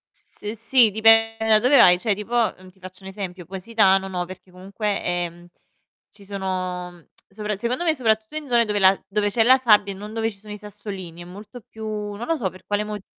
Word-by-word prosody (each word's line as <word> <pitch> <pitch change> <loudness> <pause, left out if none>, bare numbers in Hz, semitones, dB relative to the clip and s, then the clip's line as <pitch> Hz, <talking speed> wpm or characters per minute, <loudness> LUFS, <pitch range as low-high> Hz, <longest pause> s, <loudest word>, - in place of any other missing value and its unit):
S - - -17
uhm, 210 - -2
sì, 230 +1 +3
dipende 225 +1 +4
da 220 -1 +6
dove 250 +6 +4
vai. 180 -8 +7
Cioè, 210 +2 0
tipo 210 +4 -7
uhm, 200 -6 -1
ti 190 +1 -28
faccio 185 +1 -12
un 190 - -9
esempio: 190 -2 -7
Positano 195 +1 +1
no, 180 -2 -3
perché 185 +1 -12
comunque, 195 +3 -4
ehm, 175 -1 -3 0.6
ci 205 -1 -17
sono 185 -3 -5 0.2
sopra 210 +1 -4
secondo 240 - -2
me 320 -2 +2
soprattutto 220 0 -1
in 305 -2 -5
zone 240 -1 +3
dove 210 -2 -1
la 190 0 +4
dove 205 +1 0
c'è 225 +2 +2
la 255 +3 +6
sabbia 210 -5 +3
e - - -10
non 210 +2 -9
dove 225 0 -1
ci 200 - -16
sono 210 +1 -11
i - - -6
sassolini, 195 -4 -9
è - - -10
molto 205 +7 -11
più 220 -1 -12
non 210 +1 -5
lo 330 - 0
so 215 -10 -2
per 185 +1 -16
quale 205 0 -1
motivo. 210 -2 -7
205 Hz, 225 wpm, -22 LUFS, 190-225 Hz, 0.6 s, vai